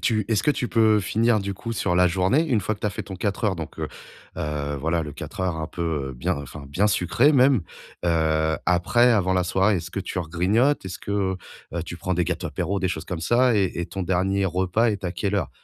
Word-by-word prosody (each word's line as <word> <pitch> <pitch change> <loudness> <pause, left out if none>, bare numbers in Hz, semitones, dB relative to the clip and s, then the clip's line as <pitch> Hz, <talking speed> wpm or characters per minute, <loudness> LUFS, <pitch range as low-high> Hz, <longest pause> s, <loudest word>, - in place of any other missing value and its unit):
tu 110 -4 +1
est-ce 110 -3 +2
que - - +3
tu 125 -4 -1
peux 110 -2 +4
finir 110 +3 +2
du 100 -1 -3
coup 105 +4 -6
sur 90 -4 0
la 90 0 +5
journée? 95 - +2
Une 110 -7 +2
fois 110 - -1
que 105 - -18
tu - - -1
as - - 0
fait - - -5
ton 95 - -8
4 100 +3 -2
heures 95 -4 +1
donc, 80 - -7
heu, - - -3 0.5
heu, 75 -1 -2
voilà, 80 +2 0
le 75 -2 -6
4 - - -8
heures 90 -3 0
un 80 - -3
peu 75 -6 -3
bien 60 - 0
enfin, 70 +1 -9
bien 90 +10 +1
sucré 105 - +3
même. 130 -4 +5 0.5
Heu, 80 -2 +2
après, 105 +8 +3
avant 95 -3 +2
la 90 - +2
soirée, 95 +3 +2
est-ce 85 +1 -5
que 100 - -3
tu 90 -1 -4
regrignotes? 95 - +1
Est-ce 90 - -6
que, - - -8 0.6
heu, 85 - -1
tu 85 0 -7
prends 90 +2 -1
des 90 0 +1
gâteaux 90 +1 -2
apéro, 90 +6 -2
des 95 - +1
choses 85 -2 -4
comme 90 -3 -5
ça? 120 +6 +3
Et 95 -3 +2
et - - -1
ton 95 +2 -5
dernier 95 +2 +1
repas 95 +6 +1
est 100 -2 -4
à 90 - -1
quelle 100 0 -2
heure? 100 - -1
95 Hz, 245 wpm, -24 LUFS, 85-105 Hz, 0.6 s, la